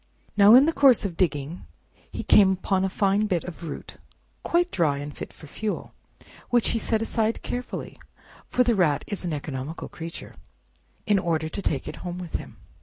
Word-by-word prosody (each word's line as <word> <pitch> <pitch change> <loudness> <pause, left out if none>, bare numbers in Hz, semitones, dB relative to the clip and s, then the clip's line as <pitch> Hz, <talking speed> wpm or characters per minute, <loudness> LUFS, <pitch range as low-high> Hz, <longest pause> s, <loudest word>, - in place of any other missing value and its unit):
Now 205 +2 +8
in 265 +3 +8
the 325 - +1
course 265 -8 +5
of 180 -4 -3
digging, 160 -2 -1 0.5
he - - -5
came 195 -2 +6
upon 190 0 0
a 190 - +1
fine 200 +2 +1
bit 180 -5 0
of 175 -1 -9
root, 145 - -8 0.4
quite 350 +1 +1
dry 155 -6 +1
and 145 0 -6
fit - - -7
for - - -14
fuel, 210 +8 -4 0.6
which 240 -2 +3
he 230 - 0
set 225 0 0
aside 225 0 0
carefully—for 250 0 -4
the 240 -1 +2
Rat 170 -8 +2
is 205 - -5
an 170 - -2
economical 145 0 -5
creature—in 170 +4 -6
order 160 -3 -1
to 200 - -5
take 140 -8 -2
it 150 - -6
home 175 -1 -6
with 180 -2 -4
him. - - -11
190 Hz, 180 wpm, -25 LUFS, 160-220 Hz, 0.6 s, Now